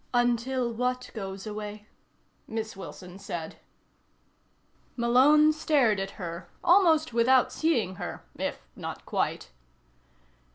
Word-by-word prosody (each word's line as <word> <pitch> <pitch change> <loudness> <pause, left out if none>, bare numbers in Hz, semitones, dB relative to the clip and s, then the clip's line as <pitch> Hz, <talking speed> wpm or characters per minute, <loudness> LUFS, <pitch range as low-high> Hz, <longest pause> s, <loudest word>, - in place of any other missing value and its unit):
"Until 240 0 +1
what 250 +2 -2
goes 195 -2 -6
away?" 210 0 -6 0.6
Miss 220 -1 -4
Wilson 185 -1 -10
said. 170 -5 -6 1.4
Malone 275 +6 +5
stared 280 -9 +2
at 195 0 -5
her 170 -1 -6
almost 335 -6 +4
without 250 +2 +4
seeing 235 - 0
her, - - -6
if - - -4
not - - -7
quite. - - -2
235 Hz, 100 wpm, -28 LUFS, 200-265 Hz, 1.4 s, Malone